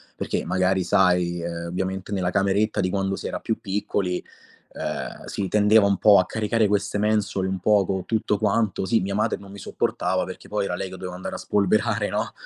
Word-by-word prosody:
perché - - -3
magari 95 0 +1
sai, 90 -3 +2
uhm, 85 0 -4
ovviamente 95 +3 -3
nella 90 -2 0
cameretta 100 +3 +1
di 90 -2 +1
quando 95 0 -1
si - - -5
era - - -4
più 110 - -2
piccoli, 95 -2 -2 0.5
uhm, - - -5
si 100 - -3
tendeva 105 0 +5
un 100 -2 +2
po' 105 -2 +6
a 90 - +2
caricare 110 +1 +1
queste 100 0 0
mensole 105 -3 0
un 95 -1 -2
po' 105 +1 +3
co' 95 0 -2
tutto 110 -2 0
quanto, 105 -1 0
sì 115 +4 +2
mia 100 +1 -2
madre 110 +2 +1
non 100 0 -13
mi 100 - -10
sopportava 95 +1 -1
perché 95 - -9
poi 105 -1 -1
era 90 -3 -2
lei 95 - -3
che 95 - -8
doveva 90 -1 -7
andare 90 - -6
a - - -4
spolverare 105 +1 +1
no, - - -2
100 Hz, 205 wpm, -24 LUFS, 95-105 Hz, 0.5 s, po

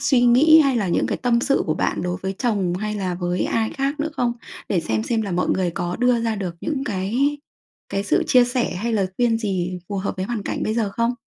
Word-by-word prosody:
suy 260 -3 +3
nghĩ 285 +7 +6
hay 275 -4 +2
là 205 -5 0
những 170 - +1
cái - - -2
tâm 235 -1 +3
sự 275 +2 +2
của 155 - +1
bạn - - -1
đối 180 0 -2
với 190 0 -2
chồng 200 -8 0
hay 210 +3 -3
là 185 -3 -2
với 175 0 -1
ai 220 -1 0
khác 275 +2 -2
nữa 310 - 0
không? 240 -1 +1 0.4
Để 180 -4 +1
xem 110 -6 -1
xem 225 - 0
là 195 -3 -4
mọi 180 - 0
người 185 -2 +1
có 175 +1 -3
đưa 245 -1 +2
ra 225 -2 -1
được 180 -4 -4
những 280 -3 -2
cái 240 +8 0 0.5
cái 195 0 -2
sự - - +2
chia 250 -1 +5
sẻ 245 0 -1
hay 230 +6 -2
lời 200 -3 +1
khuyên 235 -2 +2
gì 185 -4 -2
phù 200 - -3
hợp 190 0 -3
với 185 - -2
hoàn 225 -2 -3
cảnh - - -3
bây 215 - -1
giờ 220 -4 0
không? 235 +1 0
220 Hz, 255 wpm, -22 LUFS, 185-245 Hz, 0.5 s, nghĩ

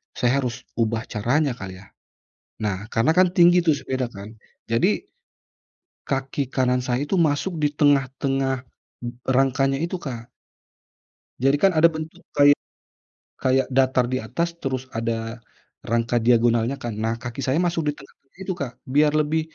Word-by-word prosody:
saya 125 +3 +2
harus 125 0 -4 0.2
ubah 115 0 0
caranya 125 +7 0
kali 95 -5 -8
ya". 100 - -14 0.8
Nah, 105 +1 -3
karena 130 +7 +3
kan 185 -1 +5
tinggi 175 0 +6
itu 160 - +4
sepeda 130 -4 -3
kan, 100 +2 -10 0.3
jadi, 120 - +2 1.1
kaki 135 0 -2
kanan 125 -1 +1
saya 125 +2 -1
itu - - -2
masuk 160 +2 0
di 150 - +3
tengah-tengah 135 -2 +1 0.4
m - - -2 0.2
rangkanya 135 +1 +2
itu 170 +4 -3
Kak. 120 -4 -7 1.1
Jadi 135 +1 +5
kan 195 - +5
ada 165 +1 +7
bentuk 155 0 -7
kayak 145 0 +7 0.9
kayak 130 0 +2
datar 130 -1 +3
di - - +2
atas, 165 +10 -1
terus 130 -1 -2
ada 115 0 -3 0.5
rangka 115 +1 +1
diagonalnya 120 +1 +3
kan. 120 -2 -3
Nah, 115 +1 +1
kaki 120 +2 -5
saya 135 +4 +1
masuk 170 -1 0
di - - +2
tengah-tengah 140 +1 -19
itu 190 - -2
Kak. 125 -3 -2 0.2
Biar 150 +1 +5
lebih, 155 +2 +1
130 Hz, 150 wpm, -23 LUFS, 120-145 Hz, 1.1 s, ada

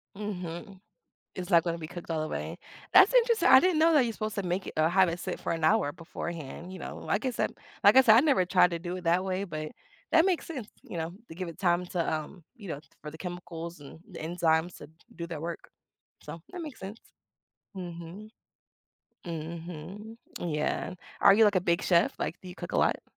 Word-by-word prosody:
Mhm. 190 -1 -6 0.6
It's 185 +1 -6
not 170 -3 +6
gonna 170 -1 -2
be 155 - -6
cooked 175 0 -9
all 160 -1 0
the 155 - -3
way. - - -5 0.3
That's 390 +6 +7
interesting. 470 -2 +4
I - - +9
didn't 360 -3 +2
know 325 +1 +5
that 285 - +6
you're 230 - -2
supposed 215 0 -4
to 200 - -1
make 180 +1 -2
it - - -7
uh, 155 +1 +4
have 185 0 +4
it 170 +1 -2
sit - - -4
for - - -2
an 165 -1 -2
hour 145 -2 +3
beforehand, 170 0 -7
you 185 - -8
know, - - -7
like 205 +6 -1
I 260 - +1
said - - -1 0.3
like 205 +5 +7
I - - +11
said, 220 -2 +7
I - - +8
never 270 -11 +3
tried 180 0 +4
to 170 - -1
do 175 +2 -5
it 180 - -8
that 175 +3 +2
way, 190 +1 -1
but 155 -4 -5 0.4
that 330 +2 +6
makes 365 -3 0
sense, 260 -10 -6
you 175 - -7
know, 165 +1 -3 0.2
to 160 - -9
give 180 0 -5
it 165 - -9
time 175 -1 +2
to, 175 -3 -1
um, 155 +3 -6
you 205 -5 -10
know, 145 -2 -4 0.2
for 150 - -7
the 160 - -11
chemicals 175 -1 -6
and 145 +3 -12
the 175 - -9
enzymes 165 +1 0
to - - -11 0.3
do 170 - -4
their 160 -3 -5
work. 170 +1 -6 0.5
So, 165 - -9
that 360 - -7
makes 300 -4 -8
sense. 200 +4 -7 0.8
Mhm. 175 +4 -8 1.0
Mhm, 170 +6 -7 0.2
yeah. 155 +1 -2 0.3
Are - - +8
you, 220 +1 +6
like, 205 -1 +4
a - - +4
big 170 +2 +2
chef? 170 -2 +3
Like, 170 - -3
do 185 - -9
you 180 - -8
cook - - -7
a - - +2
lot? - - +2
180 Hz, 225 wpm, -29 LUFS, 165-205 Hz, 1.0 s, I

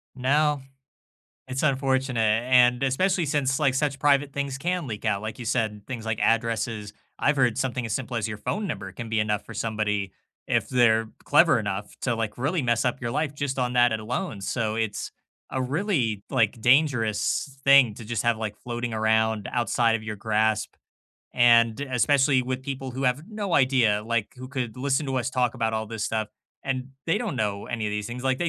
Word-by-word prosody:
No. 145 +3 +2 0.9
It's 130 +2 -3
unfortunate, 130 -5 +1
and 125 -1 +5
especially 175 +7 +1
since, 140 -2 0
like, 140 -4 +2
such 135 0 -1
private 145 -1 +3
things 140 -1 -3
can 175 0 -2
leak 105 -3 -6
out, 100 - 0
like 110 0 -5
you 125 - -7
said, 110 -3 -1
things 120 -3 -6
like 110 -1 -2
addresses. 115 -2 0 0.3
I've 145 - +2
heard 125 -5 +2
something 125 -2 -1
as 110 - -3
simple 125 -2 -3
as 110 -3 -1
your 105 -1 -4
phone 205 - -3
number 95 - -5
can 115 +3 -7
be 110 -1 +1
enough 105 -1 0
for 115 - -9
somebody 105 -3 -2 0.3
if - - 0
they're 115 -3 +3 0.2
clever 150 -3 +5
enough 100 -1 -4
to, 125 -3 +1
like, 115 -1 -3
really 145 +6 0
mess 120 -1 +1
up 125 +1 -1
your 120 -1 -2
life 150 +1 -1
just 140 -2 -2
on 125 -1 0
that 120 -1 +4
alone, 110 -2 -4
so 110 +2 -2
it's 110 -3 -3 0.4
a 130 - -1
really, 130 - -1
like, 115 -4 +1
dangerous 130 0 +2
thing 135 -6 +6
to 115 - -10
just 115 -1 -2
have 120 -2 +2 0.3
floating 120 -1 -3
around 110 -1 +1
outside 120 -1 +2
of 110 - -12
your 110 -1 -5
grasp, 110 +1 0 0.6
and 115 -2 +5
especially 135 0 +2
with 130 +1 -3
people 135 -1 -5
who 130 +2 -4
have 135 +7 0
no 205 -5 -3
idea, 125 -6 +3
like, 115 -3 0
who 130 - -8
could 130 -3 -4
listen 135 +3 0
to 135 -1 -2
us 125 -1 -1
talk 125 -2 0
about 110 -1 -1
all 110 0 -2
this 110 -1 -4
stuff, 110 -1 -1 0.4
and 130 -1 -2 0.2
they 165 - +2
don't 215 - -3
know 105 -2 -2
any 115 -3 -3
of - - -2
these 105 0 -3
things, 125 +2 -6
like, 130 -1 +1
they 175 - 0
120 Hz, 195 wpm, -25 LUFS, 110-135 Hz, 0.9 s, thing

